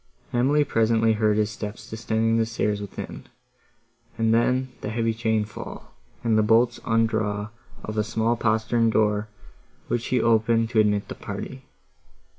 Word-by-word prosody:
Emily 135 +5 +3
presently 115 -3 +2
heard 105 -1 +2
his 105 0 +1
steps 105 0 -7
descending 115 0 0
the 115 - +2
stairs 105 -2 -1
within, 100 - -7 0.9
and 115 0 +2
then 125 +3 +2
the - - -4
heavy 115 +1 0
chain 110 -1 0
fall, 105 - -9 0.3
and 110 -2 +3
the - - +5
bolts 115 +2 +3
undraw 110 -2 0 0.3
of 110 0 -3
a - - +2
small 110 +2 0
postern 115 +1 +1
door, 105 -1 +1 0.6
which 120 0 -1
he 125 - +1
opened 115 0 +2
to 115 - +3
admit 105 -1 +2
the - - -5
party. 130 +6 -7
110 Hz, 150 wpm, -24 LUFS, 105-115 Hz, 0.9 s, the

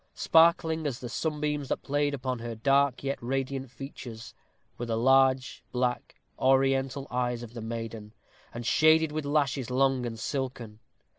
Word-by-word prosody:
Sparkling, 160 -1 +3
as 130 -4 -3
the 125 -2 -7
sunbeams 150 0 -2
that - - -2
played 145 0 0
upon 130 -2 -3
her 115 0 -5
dark 140 +3 +2
yet 140 0 -2
radiant 135 +1 -3
features, 120 -3 -9 0.5
were 120 - -3
the 115 -1 -1
large, 130 +1 +3
black, 125 0 -2 0.2
Oriental 135 +1 +2
eyes 120 -1 -1
of 120 -1 -10
the 120 - -7
maiden, 115 -1 -6 0.4
and 120 0 -7
shaded 155 +4 +4
with 155 -1 -3
lashes 140 -4 0
long 130 -1 +2
and 115 -1 -6
silken. 120 -3 -4
130 Hz, 150 wpm, -28 LUFS, 120-140 Hz, 0.5 s, shaded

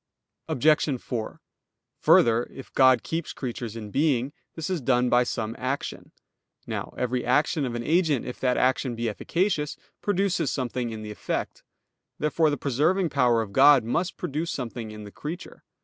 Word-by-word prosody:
Obj. 150 -1 +2
4: 115 -3 -5 0.6
Further, 115 +1 +5
if 135 - -12
God 130 -3 +5
keeps 165 0 -3
creatures 120 -3 -5
in 105 -2 -7
being, 140 -1 +1 0.2
this 160 - -4
is 185 -5 -2
done 125 -1 +2
by 120 +1 +4
some 115 -2 -3
action. 130 +3 -4 0.5
Now - - -5
every 125 0 -1
action 145 +4 +2
of 120 -2 -3
an 120 - -3
agent, 155 -3 +2
if 125 - -6
that 125 -1 +1
action 130 -1 +1
be 115 0 -2
efficacious, 155 - -1 0.2
produces 195 -5 +1
something 125 -2 -2
in 110 -1 -6
the 105 - -6
effect. 105 - -4 0.6
Therefore 155 +1 +2
the 145 - -1
preserving 160 +7 +1
power 120 -4 +3
of 100 -2 -10
God 135 0 +7
must 170 +11 -1
produce 155 +4 -3
something 120 -3 -4
in 105 0 -9
the 105 - -10
creature. 165 - -7
130 Hz, 165 wpm, -26 LUFS, 120-150 Hz, 0.6 s, God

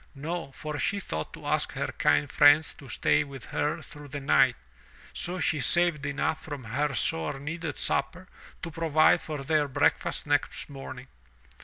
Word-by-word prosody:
No, 160 +1 -4
for 150 0 -5
she 200 - 0
thought 80 - -4
to - - -11
ask - - 0
her - - -2
kind 75 -1 +2
friends 145 +2 +5
to 135 - -14
stay 150 +4 +2
with 135 -4 -9
her 150 +1 -1
through 150 -2 -11
the 145 +1 -5
night, 135 -2 +4 0.6
so 180 +1 -1
she 155 -5 +1
saved 165 +1 +3
enough 145 +2 -1
from 145 -4 -7
her 135 +5 -1
sore 80 +3 0
needed 160 +1 -5
supper 180 +6 -2 0.4
to 165 - -4
provide 160 -1 +3
for 150 -3 -5
their 150 0 +2
breakfast 145 +3 0
next 145 0 -1
morning. 135 -2 -8
145 Hz, 165 wpm, -28 LUFS, 135-160 Hz, 0.6 s, friends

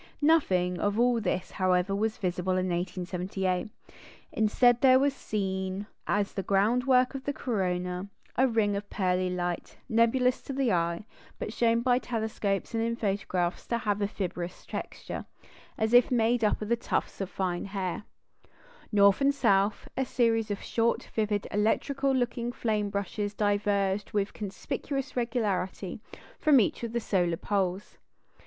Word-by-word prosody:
Nothing 185 - +3
of 205 +4 0
all 240 -1 +3
this, 185 -2 -2
however, 185 +1 +1
was 215 +2 -1
visible 185 -1 -1
in 185 0 0
1878. 180 +2 -2 0.6
Instead, 240 +3 +3
there 260 -1 +7
was 280 +1 +2
seen, 190 -4 -3 0.2
as 205 -1 0
the 195 - -2
groundwork 250 +7 +3
of 270 -1 -6
the 285 - 0
corona, 180 -6 -2 0.3
a 260 +2 +4
ring 220 -4 +1
of 200 0 -5
pearly 185 -2 0
light, 175 -1 -3
nebulous 250 +2 +3
to 275 - -6
the 265 -3 +1
eye, 170 +2 0 0.3
but 215 - -5
shown 230 0 +2
by 245 0 +3
telescopes 220 -5 -2
and 225 - 0
in 230 0 0
photographs 195 -5 -1
to 235 - 0
have 210 -2 -1
a 200 - +2
fibrous 180 -3 -5
texture, - - -6 0.5
as 220 0 0
if 245 0 +7
made 235 -1 +2
up 215 0 +1
of 235 +2 0
tufts - - -2
of 190 - -3
fine 180 -2 -2
hairs. 195 -1 -3 0.9
North 200 +2 +5
and 280 +1 +3
south, 200 -5 +2
a 265 - +1
series 230 -3 +1
of 205 - -3
short, 235 0 +1
vivid, 210 -2 0
electrical 270 +6 +1
looking 240 -2 -1
flame 215 -4 -1
brushes 200 +1 -3
diverged 205 -1 0
with 205 -1 0
conspicuous 255 +7 -4
regularity 210 -6 -2 0.4
from 295 -4 +6
each 210 - +1
of 230 - -3
the 235 - 0
solar 180 -6 0
poles. 195 0 -2
205 Hz, 150 wpm, -28 LUFS, 190-235 Hz, 0.9 s, there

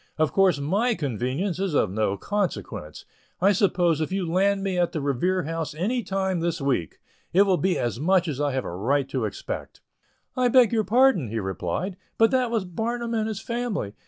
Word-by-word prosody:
Of 155 -1 +1
course 190 -5 +4
my 205 +12 +1
convenience 140 - -2
is 190 -5 -1
of 95 - +2
no 100 -1 0
consequence. 185 - -3 0.3
I 195 +3 +4
suppose 175 -5 +2
if 155 - -2
you 190 -1 -1
land 195 +3 +2
me 190 -2 -1
at 175 0 +1
the 160 - -1
Revere 150 +7 0
House 160 0 -4
any 220 +10 0
time 190 -3 -1
this 170 0 -1
week, 135 - -1 0.4
it 190 +3 +6
will 195 -2 +3
be 185 0 +1
as 120 -2 -2
much 180 +3 +2
as 145 -2 -3
I 145 -1 +1
have 130 - -2
a 85 - -5
right 135 +8 0
to 130 -4 -1
expect." 105 - -6 0.6
"I 255 -1 +2
beg 245 -2 +5
your 220 -1 +2
pardon," 240 - +4
he 110 +2 -4
replied, 95 - -3 0.2
"but 225 0 +4
that 255 -2 +2
was 225 -4 -1
Barnum 235 +6 -3
and 220 -1 0
his 220 -1 -4
family. 235 - -3
180 Hz, 200 wpm, -25 LUFS, 140-205 Hz, 0.6 s, it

